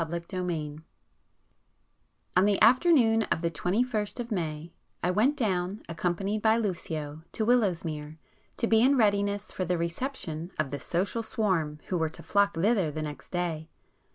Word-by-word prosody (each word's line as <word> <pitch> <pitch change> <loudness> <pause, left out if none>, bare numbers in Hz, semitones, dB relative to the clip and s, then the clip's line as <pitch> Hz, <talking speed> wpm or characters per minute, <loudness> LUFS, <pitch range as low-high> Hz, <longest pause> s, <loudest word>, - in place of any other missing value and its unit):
[p 165 - -1
254]XXII 170 -3 -4 1.6
On 185 +2 +5
the 205 -1 +3
afternoon 235 - +5
of 165 - -1
the 170 - +1
twenty 185 +8 +1
first 220 -2 -3
of 240 -1 -5
May, 160 -3 -3 0.3
I 180 - +2
went 235 +10 +2
down, 190 -3 -1
accompanied 180 +5 -1
by 220 +1 +4
Lucio, 160 -8 -3
to 220 - -1
Willowsmere, 170 -10 0 0.4
to - - +1
be 225 -1 +4
in 270 +3 +5
readiness 205 -2 +1
for 185 - -3
the 180 0 0
reception 170 - -4
of 155 -4 -1
the 145 - -3
social 195 +6 -1
swarm 180 -9 -1
who 180 - 0
were 160 -1 +1
to 160 - -12
flock 200 -1 +2
thither 195 0 +2
the 155 +1 -4
next 150 -1 -7
day. 170 -3 -3
185 Hz, 160 wpm, -28 LUFS, 165-220 Hz, 1.6 s, On